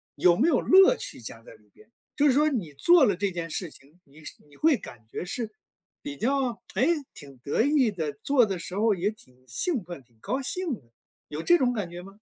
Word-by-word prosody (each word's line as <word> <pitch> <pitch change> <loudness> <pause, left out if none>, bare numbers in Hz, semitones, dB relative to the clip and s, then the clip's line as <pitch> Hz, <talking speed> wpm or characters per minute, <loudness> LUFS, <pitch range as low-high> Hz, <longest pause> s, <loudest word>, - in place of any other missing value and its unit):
有 175 -1 +4
没 275 - +3
有 290 -7 +3
乐 385 +6 +6
趣 - - -7
加 - - -9
在 - - -14
里 - - -26
边？ 430 - -21 0.3
就 295 0 +3
是 - - +5
说 300 +3 +3
你 195 - -4
做 335 - +5
了 200 - +1
这 200 +1 -1
件 170 -1 -5
事 165 0 -4
情， 145 +6 -19
你 150 +2 -19
是 - - -9
你 145 - -20
会 310 -5 +3
感 115 -2 -13
觉 - - -5
是 225 +3 -4 0.5
比 145 0 -6
较 250 - -1
诶， 275 +6 +2 0.3
挺 140 -3 -11
得 140 - 0
意 280 -4 +3
的， 160 -7 -4
做 275 -4 +3
的 195 -4 -4
时 180 - -6
候 220 0 +3
也 190 +3 -1
挺 130 -12 -15
兴 230 - -2
奋、 170 -6 -9
挺 120 -1 -33
高 260 - -2
兴， 365 +7 -2 0.7
有 150 +1 -5
这 345 - +4
种 250 -5 +1
感 205 -7 -3
觉 175 +1 -8
吗？ 195 +1 -13
205 Hz, 245 characters per minute, -26 LUFS, -, 0.7 s, 乐